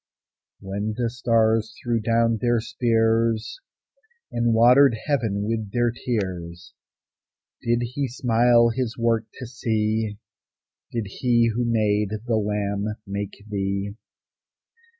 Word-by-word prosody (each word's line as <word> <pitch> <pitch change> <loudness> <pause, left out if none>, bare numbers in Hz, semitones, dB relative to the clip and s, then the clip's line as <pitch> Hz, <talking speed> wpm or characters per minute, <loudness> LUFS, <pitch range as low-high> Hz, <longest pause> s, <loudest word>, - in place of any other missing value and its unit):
When 100 +3 -3
the 120 -2 -1
stars 115 -2 +1
threw 120 -2 0
down 115 +1 +2
their 120 -1 +2
spears, 115 - 0 0.7
And 120 0 +1
watered 120 +2 +6
heaven 115 -9 0
with 110 -1 -3
their 120 +1 +1
tears, 90 -7 -4 0.9
Did 120 +1 +1
He 130 +4 -2
smile 120 -1 +3
His 120 0 -3
work 115 -1 +1
to 130 - -7
see? 110 -3 -1 0.7
Did 115 -3 -2
He 120 +2 +1
who 120 +2 -1
made 105 -2 +1
the 120 -2 +1
lamb 105 0 -1
make 100 +1 -5
thee? 100 -1 -2
115 Hz, 110 wpm, -24 LUFS, 105-120 Hz, 0.9 s, watered